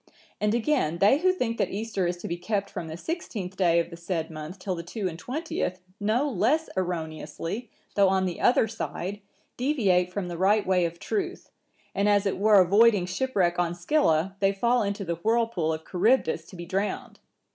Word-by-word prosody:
And 210 +1 +1
again, 235 - +1
they 205 +10 +5
who 370 +2 +4
think 245 -11 -2
that - - +1
Easter 200 -3 -2
is 175 0 -2
to - - -3
be 170 - -2
kept 200 +2 -2
from 165 - -5
the 160 +1 -6
sixteenth 205 - -5
day 175 -3 +3
of 170 +1 -2
the - - -7
said 170 -1 -3
month 155 +4 -7
till 190 0 -3
the 170 - -4
two 190 +4 -4
and 165 -2 -6
twentieth(965) 260 - -3 0.2
no 220 +7 +1
less 290 - +1
erroneously, 170 +4 -4 0.2
though 200 -2 +4
on 190 0 +2
the 180 -2 -4
other 240 -2 +4
side, 205 -2 -5 0.4
deviate 200 -10 +2
from 185 -1 -3
the 170 -1 -6
right 205 +3 +3
way 185 -2 +2
of 170 0 -4
truth, 375 - -4 0.4
and 200 +1 +2
as 205 0 +3
it 195 - -1
were 210 0 +6
avoiding 200 +1 +5
shipwreck 185 -3 0
on 175 -1 0
Scylla, 175 - +1
they 195 0 +3
fall 235 +5 +2
into 200 0 -2
the 170 -1 -2
whirlpool 225 -4 +1
of 160 0 -4
Charybdis 185 -4 +2
to 185 - -13
be 175 -1 -7
drowned. 195 +3 -3
195 Hz, 195 wpm, -26 LUFS, 175-225 Hz, 0.4 s, were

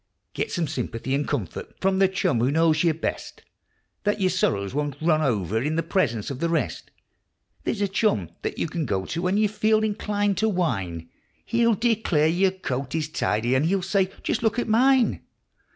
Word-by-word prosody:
Get - - -3
some 170 -3 -1
sympathy 130 -2 -3
and 140 +1 0
comfort - - -4
from 190 0 +1
the 195 - +6
chum 185 -10 0
who 120 +3 +2
knows 160 +2 +3
you 170 - +4
best, 160 +1 -5 0.6
Then 205 0 0
your 185 -2 +2
sorrows 100 - 0
won't 145 -1 -2
run 155 -1 +2
over 110 - 0
in 150 +4 -1
the 165 - 0
presence 145 - 0
of 135 - -6
the 170 - 0
rest; 165 - -2 0.8
There's 205 - -1
a - - +2
chum 190 - 0
that - - -4
you - - 0
can 160 -2 -3
go 95 -3 -1
to 170 - -3
when 185 +2 +1
you 215 0 +3
feel 215 +1 +2
inclined 205 -2 0
to 220 +1 +2
whine, 95 - -2 0.4
He'll 235 -1 +2
declare 220 -8 +1
your 180 +4 +3
coat 140 -7 -4
is 155 -1 -1
tidy, 120 -6 0
and 135 +4 +2
he'll 190 +1 +1
say: 190 0 +1
"Just - - -1
look 225 0 +1
at 240 - -1
mine 250 +2 +3
170 Hz, 195 wpm, -25 LUFS, 135-205 Hz, 0.8 s, the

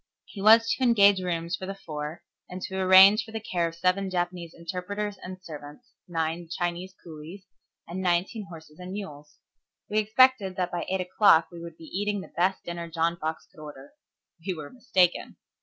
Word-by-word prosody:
He 200 - -10
was 225 +2 +7
to 260 - -1
engage 200 -5 +5
rooms 170 -1 -2
for 185 - -7
the 195 - -5
four, 150 -3 -7 0.3
and 180 - -6
to 190 - -5
arrange 190 +4 +7
for 225 - -13
the 220 - -4
care 175 -5 -1
of 165 - -8
seven 185 +3 0
Japanese 175 -2 -3
interpreters 185 +5 -5
and 185 0 -8
servants, 155 +9 -11 0.2
nine 165 0 -3
Chinese 175 +2 -3
coolies, 165 +4 -10 0.4
and 180 +3 -5
nineteen 190 +4 0
horses 160 -3 -13
and 180 +1 -7
mules. 150 -7 -8 0.5
We 215 - +2
expected 220 -2 +3
that 180 -1 -2
by 175 - -4
eight 190 0 0
o'clock 180 -2 +4
we 170 -1 -10
would 170 -1 -9
be - - -14
eating 205 +4 -2
the - - -13
best 185 +2 +1
dinner 170 -1 -6
John 165 +1 0
Fox 160 -1 -4
could 155 - -15
order. 145 -2 -11 0.5
We 185 0 -2
were 155 -3 -8
mistaken. 185 -8 +1
180 Hz, 185 wpm, -27 LUFS, 165-195 Hz, 0.5 s, was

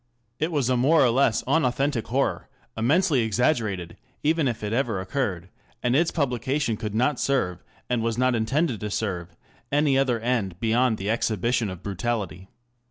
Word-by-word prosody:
It 155 +3 0
was 145 -6 +1
a 130 - +2
more 140 +4 +4
or 120 - +3
less 135 +4 +2
unauthentic 135 -4 +1
horror, 130 +2 -1 0.3
immensely 145 +6 +2
exaggerated, 110 - 0 0.3
even 155 -1 +2
if 115 -3 -3
it 105 +1 -2
ever 115 -5 0
occurred, 95 -4 -3 0.3
and 125 +1 +2
its 165 +3 +3
publication 135 -2 -1
could 105 -1 -5
not 130 +3 +1
serve, 110 -11 0 0.2
and 120 -2 0
was 115 0 -1
not 130 0 +2
intended 120 +2 0
to 105 - -4
serve, 90 -5 -3 0.4
any 145 -1 +3
other 125 -4 +1
end 110 -7 -1
beyond 115 +1 +2
the 100 +2 -2
exhibition 115 0 0
of 95 -2 -8
brutality. 100 -2 -3
120 Hz, 165 wpm, -25 LUFS, 105-135 Hz, 0.4 s, more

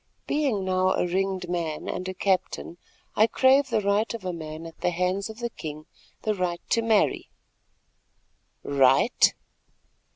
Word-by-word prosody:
"Being 270 -10 0
now 185 0 +2
a - - 0
ringed 190 0 -1
man 170 -3 -3
and 185 +1 -3
a 185 - -5
captain, 185 -2 -1 0.4
I 220 - +5
crave 265 +4 +4
the 225 -3 +1
right 200 +2 +1
of 215 -5 -9
a 180 - -2
man 160 0 -7
at 165 - -12
the - - +2
hands 180 +4 -1
of 220 - -9
the 235 0 -4
king—the 155 +7 -6
right 180 -3 -2
to 230 - +3
marry." 225 -2 +1 1.3
"Right? 140 - +4
185 Hz, 150 wpm, -26 LUFS, 170-220 Hz, 1.3 s, I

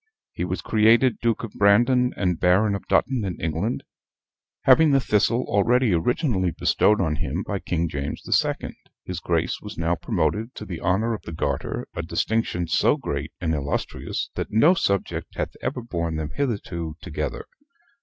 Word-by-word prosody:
He - - -3
was - - -3
created 115 +3 +4
Duke 115 -2 0
of 115 - -6
Brandon 120 +5 +4
and 90 -4 0
Baron 95 +4 +3
of 100 - -5
Dutton 130 -4 +2
in 95 -3 -4
England; 85 +9 -2 0.8
having 150 +4 +6
the 135 -1 +4
Thistle 115 0 +2
already 115 +2 +2
originally 95 - +1
bestowed 105 +4 +2
on 80 -4 0
him 80 +4 -2
by 100 -2 -2
King 85 -2 -1
James 70 -2 -4
the - - -1
Second, - - 0 0.3
his 90 -2 -4
Grace 85 -1 -1
was 105 0 -9
now 85 +1 +1
promoted 110 - -1
to 105 - -7
the 85 -5 -6
honor 100 +6 +1
of 110 - -5
the - - -8
Garter 70 -3 -2
a 85 - -2
distinction 90 +1 -1
so - - +3
great - - -4
and 80 -2 -1
illustrious, 75 -1 -3
that - - -4
no 145 - +5
subject 100 - -1
hath - - -3
ever 125 -1 -3
borne 85 -7 -3
them 80 -1 -3
hitherto 95 - -3
together. - - -4
100 Hz, 170 wpm, -24 LUFS, 85-115 Hz, 0.8 s, having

